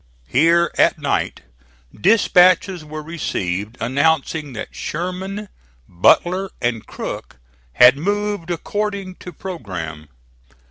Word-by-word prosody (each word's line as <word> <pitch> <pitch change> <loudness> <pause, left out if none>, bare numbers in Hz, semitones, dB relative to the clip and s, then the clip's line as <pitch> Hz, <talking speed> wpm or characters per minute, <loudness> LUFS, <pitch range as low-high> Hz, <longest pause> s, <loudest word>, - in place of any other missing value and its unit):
Here 165 - +3
at - - +4
night - - -1 0.5
dispatches 185 - +4
were 155 0 -7
received 105 - -3
announcing 145 +3 0
that 110 - -7
Sherman, 185 +5 -4 0.4
Butler 180 - +3
and 120 -3 -2
Crook - - -7 0.4
had 125 - +7
moved 205 +1 -2
according 200 +2 -3
to 180 - -9
programme. 90 - -7
165 Hz, 95 wpm, -20 LUFS, 125-185 Hz, 0.5 s, had